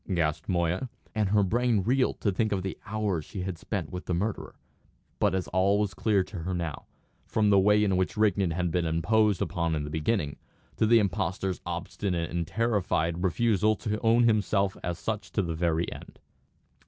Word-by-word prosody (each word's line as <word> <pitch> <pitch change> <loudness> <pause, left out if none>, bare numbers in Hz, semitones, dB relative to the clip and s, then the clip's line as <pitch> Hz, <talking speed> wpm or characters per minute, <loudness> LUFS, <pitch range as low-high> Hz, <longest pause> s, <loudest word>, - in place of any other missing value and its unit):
gasped 80 -2 -1
Moya; 90 +6 0 0.2
and 105 -3 0
her 105 0 +4
brain 115 +1 +1
reeled 125 +4 +1
to 100 - +2
think 110 +3 0
of 95 -2 -1
the 95 - -3
hours 105 -6 -1
she 95 +5 -7
had 90 -1 -3
spent - - -4
with 90 0 -6
the 90 - 0
murderer. 100 +5 -3 0.6
But - - +2
all 95 +2 +3
was 105 -2 0
clear 100 -1 +2
to 95 -1 -8
her 90 +3 -3
now, 85 -4 -4 0.4
from 105 -1 +2
the 100 - +6
way 105 +2 +4
in 95 -2 +2
which 95 +3 -1
Rigden 100 -3 +2
had 85 +1 -1
been 85 0 0
imposed 100 +5 +2
upon 85 -3 -1
in 75 - -2
the 75 - -6
beginning, 80 -1 -1 0.4
to 110 - +3
the 115 +1 +6
impostor's 95 -2 -1
obstinate 90 0 -3
and 85 -1 -2
terrified 90 -5 0
refusal 110 +2 +2
to 105 +1 -3
own 115 +1 +4
himself 105 -3 +2
as 85 -1 -2
such 110 +1 -4
to 100 - +1
the 85 -2 -2
very 85 0 0
end. - - -12
95 Hz, 190 wpm, -28 LUFS, 85-105 Hz, 0.6 s, the